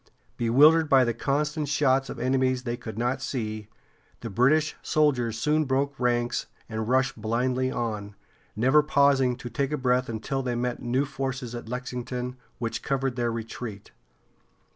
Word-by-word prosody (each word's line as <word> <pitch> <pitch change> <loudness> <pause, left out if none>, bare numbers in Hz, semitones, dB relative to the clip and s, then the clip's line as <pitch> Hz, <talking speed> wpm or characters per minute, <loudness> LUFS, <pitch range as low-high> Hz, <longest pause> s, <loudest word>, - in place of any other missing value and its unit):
Bewildered 150 +7 +5
by 135 -1 +6
the 120 -1 0
constant 150 +4 -1
shots 135 -2 +2
of - - -6
enemies 130 +1 +1
they 120 -2 -2
could 110 -3 -8
not 125 +3 -1
see, 110 -6 -4 0.5
the 115 - -5
British 145 +9 +3
soldiers 125 -7 +1
soon 150 +5 +1
broke 135 +1 -1
ranks 120 -1 0 0.2
and 110 0 -4
rushed 130 -2 +1
blindly 125 +4 0
on, 105 -5 -3 0.4
never 130 +8 +4
pausing 140 -4 +3
to 120 - -8
take 135 +5 -1
breath 125 0 +1
until 115 +4 -2
they 125 -2 -2
met 125 0 -2
new 125 +3 0
forces 135 -3 -4
at 120 -2 -7
Lexington, 125 0 -4 0.2
which 115 -1 -3
covered 135 -2 -1
their 120 -1 0
retreat. 110 -2 -6
125 Hz, 150 wpm, -26 LUFS, 120-135 Hz, 0.5 s, by